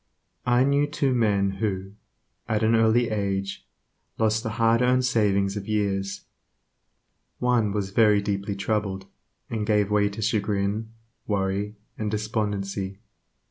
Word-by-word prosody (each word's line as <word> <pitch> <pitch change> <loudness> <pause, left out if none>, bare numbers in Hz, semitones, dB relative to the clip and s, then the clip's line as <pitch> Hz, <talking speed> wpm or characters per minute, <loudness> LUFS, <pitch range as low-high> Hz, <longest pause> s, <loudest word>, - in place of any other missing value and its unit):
I 120 +1 +4
knew 140 +1 +2
two 140 -2 0
men 100 -5 +2
who, 95 -3 -2 0.6
at 110 0 +1
an 110 +1 +3
early 115 +1 +3
age, 100 -2 -2 0.5
lost 110 0 +2
the 115 - -3
hard 115 0 +3
earned 125 +1 +3
savings 100 -5 +2
of 100 -1 -5
years. 100 -2 -1 1.2
One 120 -4 +2
was 100 -2 -2
very 105 -1 +5
deeply 100 0 -2
troubled, 100 -1 -2 0.4
and 110 -2 -3
gave 105 -1 +2
way 105 -1 +3
to 105 +2 -7
chagrin, 105 0 0 0.4
worry, 100 +1 -1 0.2
and 110 -1 -1
despondency. 105 -2 -2
105 Hz, 130 wpm, -25 LUFS, 100-110 Hz, 1.2 s, very